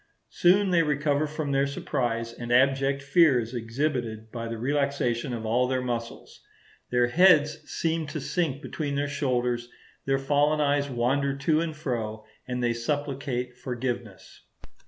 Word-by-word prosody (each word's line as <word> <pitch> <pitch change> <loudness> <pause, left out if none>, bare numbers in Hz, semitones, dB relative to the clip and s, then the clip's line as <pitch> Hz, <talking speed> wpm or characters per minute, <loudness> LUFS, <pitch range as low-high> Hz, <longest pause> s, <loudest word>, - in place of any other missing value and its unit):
Soon 190 +2 +4
they 170 -2 +4
recover 150 -1 +1
from 150 -1 -3
their 135 0 +2
surprise, 115 -4 -2
and 120 0 -6
abject 135 +2 +3
fear 140 -2 +5
is 115 +1 -5
exhibited 115 -2 -3
by 115 -1 -5
the 115 0 -4
relaxation 135 -1 0
of 115 -2 -4
all 120 +3 +2
their 130 0 -1
muscles; 120 -2 -5 0.5
their 125 -1 +3
heads 155 -1 +5
seem 165 -1 -1
to 155 +2 -4
sink 150 -1 -2
between 145 -3 -3
their 145 +1 0
shoulders; 125 -4 -1 0.4
their 135 0 +2
fallen 145 +2 +2
eyes 145 -1 +1
wander 135 +3 0
to 155 +3 +2
and 165 -2 -3
fro; 110 -7 -4 0.2
and 125 -1 -2
they 120 -1 +2
supplicate 130 0 -3
forgiveness. 120 -5 -5
135 Hz, 150 wpm, -27 LUFS, 120-145 Hz, 0.5 s, fear